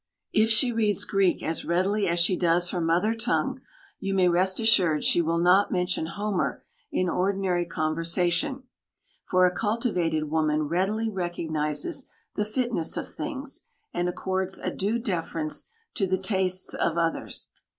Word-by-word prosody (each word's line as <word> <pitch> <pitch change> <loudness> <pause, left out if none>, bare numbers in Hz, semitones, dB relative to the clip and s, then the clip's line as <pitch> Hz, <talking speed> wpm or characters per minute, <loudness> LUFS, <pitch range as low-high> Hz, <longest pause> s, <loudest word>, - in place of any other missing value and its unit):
If 220 +1 +4
she 230 +3 +5
reads 215 -3 +1
Greek 195 -2 +1
as 160 - -2
readily 195 +4 +1
as 170 0 0
she 175 +2 +3
does 175 0 +2
her 180 - -2
mother 170 +7 +2
tongue, 225 - -1 0.4
you 195 0 -2
may 185 -2 +4
rest 185 +2 +2
assured 185 -9 +4
she 175 - +4
will 165 0 0
not 180 +4 +4
mention 180 -3 -1
Homer 205 +1 -2 0.3
in 185 - 0
ordinary 185 -1 0
conversation, 170 - 0 0.7
for 185 0 +5
a 180 - +3
cultivated 180 -7 0
woman 155 -1 +1
readily 190 +8 0
recognises 160 -5 -2 0.2
the 210 - -1
fitness 225 -6 -1
of - - -3
things, 290 -3 -6 0.3
and 175 0 0
accords 190 +1 -2
a - - -3
due 205 +4 -1
deference 165 -8 -3 0.3
to 195 - 0
the 185 0 +1
tastes 190 -1 0
of 170 - 0
others. 165 -1 -2
185 Hz, 150 wpm, -26 LUFS, 170-205 Hz, 0.7 s, she